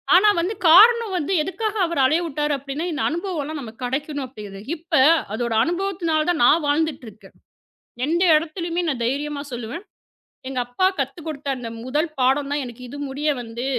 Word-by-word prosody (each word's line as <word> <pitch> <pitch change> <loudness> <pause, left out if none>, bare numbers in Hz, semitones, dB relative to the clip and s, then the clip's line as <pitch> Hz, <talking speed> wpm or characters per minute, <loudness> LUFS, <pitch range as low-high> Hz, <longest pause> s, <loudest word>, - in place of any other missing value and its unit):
ஆனா 400 +4 +6
வந்து, 360 +5 -1 0.2
காரணம் 445 +4 +7
வந்து, 345 +3 -1
எதுக்காக 430 +5 -3
அவர் 335 -5 -1
அலைய 320 +6 +2
விட்டார்? 295 0 -1
அப்படின்னா, 280 +5 -5
இந்த 295 -4 -2
அனுபவம் 345 0 -3
எல்லாம் 300 +1 -5
நமக்குக் 235 +1 -7
கிடைக்கணும் 285 +1 -3
அப்படிது 205 -5 -10 0.2
இப்ப, 335 +2 -16 0.4
அதோட 235 0 -2
அனுபவத்துனாலதான் 345 -3 0
நான் 315 +4 +5
வாழ்ந்துட்டு 295 -2 0
இருக்கேன். 210 +1 -18 0.7
எந்த 340 +3 +2
இடத்துலயுமே 335 +2 -3
நான் 250 -5 -2
தைரியமா 285 +3 -2
சொல்லுவேன். 245 - -6 0.7
எங்க 265 -1 -4
அப்பா 245 +10 +1
கத்து 275 +5 -3
கொடுத்த 290 -3 -5
அந்த 245 -2 -6 0.2
1 300 +6 0
பாடம் 275 +2 +2
தான் 290 -1 0
எனக்கு 245 0 -10
இது 285 - -8
முடிய 285 +3 -2
வந்து 235 +1 -6
295 Hz, 165 wpm, -22 LUFS, 260-340 Hz, 0.7 s, காரணம்